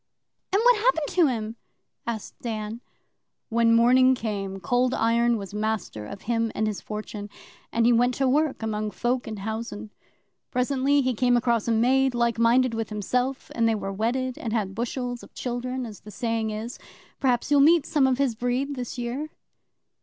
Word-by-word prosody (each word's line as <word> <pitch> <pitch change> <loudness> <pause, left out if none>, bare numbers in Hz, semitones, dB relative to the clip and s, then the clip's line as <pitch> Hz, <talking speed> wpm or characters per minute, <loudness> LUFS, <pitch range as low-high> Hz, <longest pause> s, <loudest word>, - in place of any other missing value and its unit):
'And 390 - +3
what - - +6
happened 390 -10 +1
to 350 -4 +4
him?' 225 -3 -3 0.5
asked 225 -3 -4
Dan. 220 0 -4 0.7
'When 230 0 +4
morning 255 +2 +5
came, 200 -4 -4
Cold 245 +6 +1
Iron 235 +1 +2
was 200 -1 -7
master 210 - -3
of 200 - -9
him 230 -1 0
and 215 - 0
his 215 -2 -3
fortune, 210 -1 -6 0.4
and 230 0 +2
he 240 - +5
went 245 +1 +3
to 270 - +1
work 285 -2 +1
among 215 -1 -2
folk 245 +5 -1
in 215 -1 -5
housen. 220 +1 -5 0.6
Presently 270 +3 +2
he 255 -1 +1
came 245 +1 +3
across 235 -2 +1
a - - +2
maid 255 +3 +3
like 235 -1 +1
minded 240 +1 +4
with 225 -1 -3
himself, 250 +6 -2
and 230 -1 +2
they 225 - +2
were 195 -2 -4
wedded, 245 +5 -1
and 225 -3 -3
had 205 -4 -1
bushels 245 +2 -3
of - - -15
children, 250 +1 -3
as 215 -3 -9
the 210 - -13
saying 225 0 -2
is. 220 +3 -5 0.4
Perhaps 255 0 +1
you'll 290 - +6
meet 315 +2 +5
some 275 -3 +3
of 255 -1 +1
his 275 -3 +1
breed, 245 +5 -1
this 250 -1 -5
year. 250 +6 -3
235 Hz, 180 wpm, -25 LUFS, 220-255 Hz, 0.7 s, what